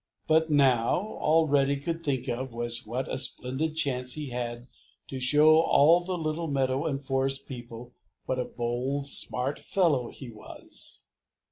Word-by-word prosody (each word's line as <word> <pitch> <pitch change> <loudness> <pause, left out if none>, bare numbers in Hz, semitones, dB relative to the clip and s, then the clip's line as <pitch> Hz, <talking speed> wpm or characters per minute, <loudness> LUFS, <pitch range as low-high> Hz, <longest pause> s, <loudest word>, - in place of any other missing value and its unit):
But 160 0 +2
now 130 -6 +3 0.2
all 160 +1 +3
Reddy 140 -1 +2
could 165 +3 -4
think 140 -5 -2
of 125 0 -4
was 120 -1 -1
what 125 +4 -3
a - - -2
splendid 130 +6 0
chance 125 -5 -1
he 150 -3 -5
had 120 0 -5 0.4
to 135 - -5
show 150 +5 +5
all 165 +3 +4
the 185 0 -3
little 160 0 -3
meadow 135 +1 0
and 135 -3 -2
forest 135 0 -1
people 120 -1 -9 0.3
what 130 - -2
a 125 - -1
bold, 125 +4 -3
smart 140 0 +3
fellow 150 -11 +1
he 130 -4 -10
was. 110 - -9
135 Hz, 155 wpm, -27 LUFS, 125-155 Hz, 0.4 s, show